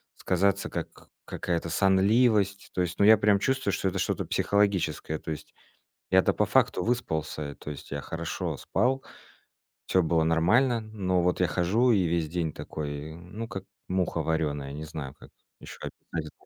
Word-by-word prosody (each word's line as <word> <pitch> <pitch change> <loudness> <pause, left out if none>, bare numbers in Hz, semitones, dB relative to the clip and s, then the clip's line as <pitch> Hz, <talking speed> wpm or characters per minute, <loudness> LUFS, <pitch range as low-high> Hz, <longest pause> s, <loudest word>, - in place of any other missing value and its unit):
сказаться 100 +2 +1
как - - -7 0.2
какая-то 85 -1 -2
сонливость. 100 +3 +3
То 90 - 0
есть, 85 -1 -2
ну 100 - +5
я 110 +1 +8
прям 100 -1 +3
чувствую, 130 -1 0
что - - 0
это 95 +1 -3
что-то - - -1
психологическое. 95 -7 +1
То - - -6
есть 75 - -7 0.6
я-то - - +4
по - - +2
факту 90 - +2
выспался, 80 -11 -1
э, - - -12
то - - -9
есть 70 - -10
я 70 0 -3
хорошо 80 +2 -4
спал, 130 +3 0 0.8
всё 95 - +3
было 80 0 +2
нормально. 110 +10 +3
Но 100 -4 -1
вот 90 +1 +1
я 90 - +3
хожу 95 +10 +2
и 100 -5 +3
весь 85 -1 0
день 85 -1 -1
такой 75 0 -6
ну 90 +7 -7
как 95 -5 -6 0.2
муха 90 -1 0
варёная, 75 -4 -1
не 75 +2 -6
знаю, 75 -3 -6
как - - -14 0.3
ещё - - -10
описать 80 -2 -6
90 Hz, 170 wpm, -28 LUFS, 80-100 Hz, 0.8 s, я